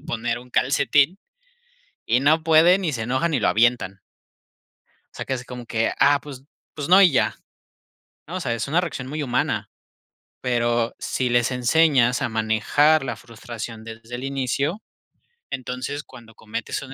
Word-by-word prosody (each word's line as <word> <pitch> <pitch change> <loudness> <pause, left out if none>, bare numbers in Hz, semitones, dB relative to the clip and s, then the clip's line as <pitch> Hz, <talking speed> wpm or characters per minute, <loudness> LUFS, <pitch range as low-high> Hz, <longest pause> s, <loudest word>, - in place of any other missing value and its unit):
poner 120 -5 -3
un 125 0 -16
calcetín. 140 +6 +2 0.9
Y 120 +2 +2
no 155 +4 +3
pueden, 165 +4 +5
y 160 - 0
se 115 -4 -3
enojan 130 +9 -1
y 130 - +1
lo - - +2
avientan. 110 -4 +1 1.2
O - - -17
sea - - -5
que 135 - -2
así 125 -1 -5
como 125 -1 -8
que: 115 0 0
"Ah, 145 0 +5
pues 135 -3 -10 0.3
pues, 145 +1 -5
no 190 +2 +8
y 185 -4 +6
ya", 135 - +1 0.9
¿no? 175 +4 -6
O - - -3
sea, 120 -9 -1
es 115 +2 -4
una 165 +5 +2
reacción 150 -7 -5
muy 150 +2 -4
humana, 125 -3 -1 0.7
pero 120 -1 0
si 130 - -2
les 120 0 +2
enseñas 125 0 +3
a 130 - 0
manejar 115 +7 +2
la 130 - -4
frustración 115 -1 -9
desde 115 +1 -10
el 125 - -7
inicio, 140 - -2 0.7
entonces, 130 +3 -5
cuando 115 -5 -15
cometes 110 +1 -5
un 135 -1 -10
125 Hz, 165 wpm, -23 LUFS, 120-150 Hz, 1.2 s, no